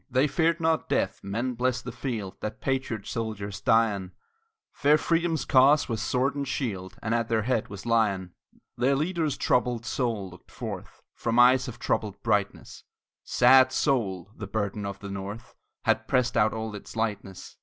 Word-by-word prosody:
They 130 +2 +3
feared 165 +2 +1
not 160 -1 0
death - - 0
men 115 +6 -2
bless 125 +1 0
the 125 - -7
field 115 -6 -4
That 110 0 -5
patriot 130 -6 -2
soldiers 105 -4 -4
die 115 -1 +4
on; 95 -2 -7 0.6
Fair 145 +2 +4
Freedom's 165 -2 0
cause 140 +3 +5
was 115 -3 -2
sword 125 +3 +1
and 140 -1 -3
shield, 110 -8 -3
And 110 +2 0
at 115 -1 +1
their 110 -2 +1
head 120 -2 0
was 100 +1 -9
Lyon. 100 -6 +1 0.4
Their 130 +3 +2
leader's 160 0 -1
troubled 120 -2 +1
soul 115 -6 -2
looked 90 - -16
forth - - -8
From 115 0 -2
eyes 125 +1 +6
of 125 - -7
troubled 100 -2 -2
brightness; 105 -3 -1 0.4
Sad 130 +1 +5
soul! 100 - 0
the 105 - -7
burden 100 0 -2
of 100 0 -5
the 100 0 -8
North 100 +5 -7 0.3
Had - - +1
pressed 125 -1 +1
out 110 +1 +4
all 110 -1 -4
its 105 - -9
lightness. 105 -4 -4
115 Hz, 170 wpm, -27 LUFS, 100-130 Hz, 0.6 s, eyes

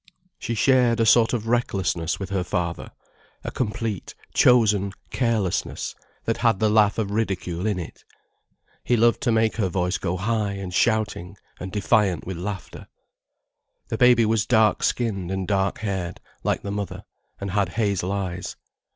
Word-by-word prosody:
She 115 - -3
shared 125 -1 +3
a 115 - +3
sort 115 +1 +5
of 115 -2 -2
recklessness 95 -8 0
with 95 -1 -5
her 95 -2 0
father, 85 -1 -3 0.5
a - - -4
complete, 110 -4 -3 0.2
chosen 105 -6 +4 0.2
carelessness 115 -7 -1 0.3
that - - 0
had - - +2
the 110 -1 +2
laugh 105 -1 +4
of 105 -3 -1
ridicule 95 -3 -2
in 105 -3 0
it. 85 - -8 0.8
He 120 - +2
loved 115 +1 +3
to 120 - +1
make 110 0 +2
her 100 -5 +1
voice 90 +1 -1
go 90 +2 -2
high 105 +1 -1
and 95 -2 -6
shouting 105 -3 0 0.2
and 95 +1 -6
defiant 105 -3 +1
with 95 -1 -5
laughter. 95 +2 -6 1.0
The 115 - -2
baby 125 -2 +6
was 110 0 +1
dark 110 -3 +3
skinned 100 -7 -1
and 95 -1 -3
dark 95 -1 +1
haired, 95 -5 -3 0.2
like - - 0
the 100 - -4
mother, 100 -1 -4 0.4
and 100 -1 -4
had 100 -2 +1
hazel 100 -4 0
eyes. 90 -3 -3
100 Hz, 160 wpm, -24 LUFS, 95-115 Hz, 1.0 s, baby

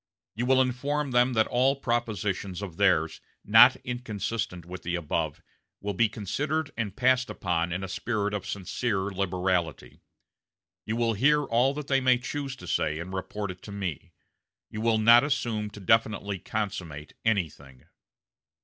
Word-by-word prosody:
You 120 +4 -2
will 130 0 +5
inform 140 +3 -2
them 125 +1 +3
that 110 -1 +3
all 130 +3 +2
propositions 105 -7 -2
of 90 -4 -7
theirs, 85 -5 +2 0.2
not 115 +5 +8
inconsistent 110 -6 -4
with 90 +1 -8
the 85 +1 -2
above, 80 -2 -2 0.4
will 100 0 -3
be 110 +4 +2
considered 145 - -2
and 105 -4 -3
passed 130 0 +2
upon 85 -1 -1
in 90 +3 -3
a - - -3
spirit 105 +1 -2
of 100 -3 -4
sincere 100 +1 -2
liberality. 90 -7 -2 0.9
You 110 - -1
will 115 -1 +1
hear 145 +7 +3
all 130 +2 +2
they 140 -2 0
may 130 -1 +4
choose 135 +2 -4
to - - -12
say, 75 0 0
and 85 +3 -6
report 100 +1 -4
it 90 0 -12
to 105 - -10
me. 95 -7 -5 0.6
You 110 - -5
will 115 -1 +3
not 115 +3 +7
assume 120 -7 -1
to 105 - -11
definitely 105 -1 +1
consummate 85 -9 -5
anything." 75 - -2
105 Hz, 155 wpm, -27 LUFS, 95-125 Hz, 0.9 s, not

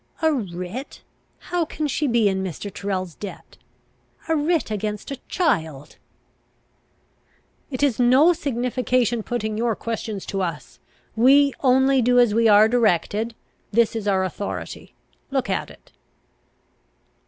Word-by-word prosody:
"A 320 -1 +4
writ? 195 +2 -6 0.3
How 355 -1 -2
can 310 -1 -3
she 295 +1 -1
be 235 -4 +3
in 190 -1 0
Mr. 190 +2 -6
Tyrrel's 185 -3 -3
debt? 195 -1 -10 0.7
A 325 - +1
writ 310 -4 0
against 210 +4 -4
a 275 - -4
child!" 160 - -1 1.7
"It 265 0 -3
is 265 -5 +1
no 260 +8 +5
signification 250 - 0
putting 220 -1 -3
your 230 -1 +1
questions 220 -3 -5
to 195 - -3
us. 165 -5 -5 0.4
We 275 +5 +5
only 265 0 +3
do 245 +1 +3
as 240 -4 +5
we 230 +1 +3
are 210 0 +7
directed. 225 0 +1 0.4
There 235 +2 +5
is 220 -3 -4
our 190 -2 +2
authority. 190 +2 -6 0.3
Look 270 -3 -1
at - - -2
it." - - -18
230 Hz, 130 wpm, -23 LUFS, 205-265 Hz, 1.7 s, are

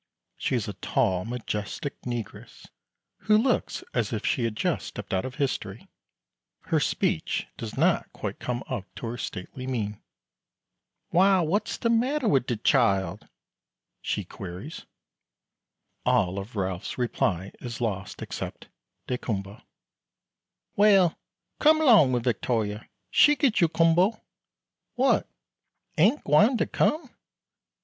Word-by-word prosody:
She - - -1
is - - -1
a - - -4
tall 90 -1 0
majestic 120 +4 -4
negress, 120 -4 -6 0.6
who 215 0 +5
looks 245 +3 0
as 115 -5 0
if 110 -3 -3
she 120 - +1
had 115 -2 -2
just - - -1
stepped - - -7
out 95 - 0
of 130 0 -6
history. 130 -8 -3 0.7
Her - - 0
speech - - 0
does - - -7
not - - +2
quite - - -6
come 125 0 -3
up 100 - -4
to - - -6
her 115 +1 -4
stately 115 +7 -6
mien. 105 -5 -3 1.1
"Why, 190 +2 +4
what's 175 +6 -1
de 230 - +1
matter 255 +3 +1
wi' 140 -10 +5
de 120 -2 -3
chile?" 105 -6 +2 0.8
she - - -2
queries. 95 - -8 1.2
All 95 +2 +2
of 105 +4 -9
Ralph's 95 -2 -3
reply 100 -6 -1
is 120 -2 -6
lost 100 -5 -3
except - - -7 0.4
"daykumboa." 105 -4 -4 1.1
"Well, 195 -5 +5 0.4
come 310 +1 +6
'long 225 - +6
wi' 125 -1 +1
Victoria 115 -3 -1 0.2
she 295 - +6
git 265 -8 +2
you 170 - +6
kumboa. 170 +7 +3 0.8
What, 265 +2 +2 0.7
ain't 210 - +3
gwine 210 - +4
to - - +1
come? 300 -5 0
125 Hz, 125 wpm, -26 LUFS, -, 1.2 s, come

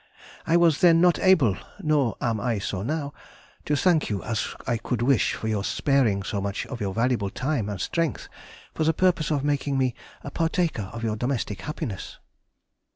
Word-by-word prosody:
I 165 - +4
was 170 -4 +3
then 170 -2 +6
not 175 0 +4
able 160 - +4 0.2
(nor 150 - +1
am 115 -3 -1
I 115 +1 0
so 100 -1 -3
now) 145 +4 -3 0.5
to 150 - +1
thank 165 +1 +2
you 100 -3 -2
as 115 -2 -2
I 120 -2 0
could 120 +1 -2
wish 130 -1 +3
for 110 - -5
your 105 -2 -1
sparing 120 -7 +1
so 100 +2 -3
much 100 0 -3
of 125 -4 -7
your 100 -2 -1
valuable 115 -1 0
time 125 -1 -2
and 100 -3 -4
strength 165 - -1 0.5
for 160 - -1
the 160 +1 +3
purpose 175 -4 +2
of 145 -3 0
making 145 -1 0
me 130 -2 +1 0.3
a - - -6
partaker 165 - -1
of 115 0 -7
your 110 -2 0
domestic 120 -4 -2
happiness. 105 - -5
130 Hz, 185 wpm, -25 LUFS, 110-155 Hz, 0.5 s, then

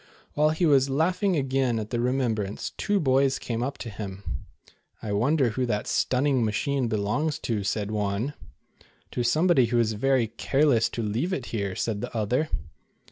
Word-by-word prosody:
While 150 +1 +3
he 160 +3 +1
was 140 -3 +4
laughing 180 +7 +1
again 135 -4 +1
at 110 -1 -4
the 120 - 0
remem 125 -1 +1
brance, 105 -2 -4
two 205 -1 0
boys 135 -3 +3
came 115 -1 -3
up 135 +3 -2
to 120 - -6
him. 100 -1 -7 0.4
" - - -30
I 105 - -3
wonder 130 +6 +2
who 125 +3 -1
that 105 -3 -1
stunning 130 -1 +1
machine 120 +4 0
belongs 115 +9 0
to," 110 -4 -1
said 105 +1 -2
one. 105 +5 -1 0.8
"To - - -2
somebody 155 +1 +4
who 120 +1 0
is 110 -1 +2
very 130 +2 +2
careless 120 +1 +2
to 115 - -2
leave 115 - -1
it 135 -8 -3
here," 100 -4 -2
said 105 -3 -2
the - - -5
other. 125 +9 0
125 Hz, 180 wpm, -26 LUFS, 110-140 Hz, 0.8 s, was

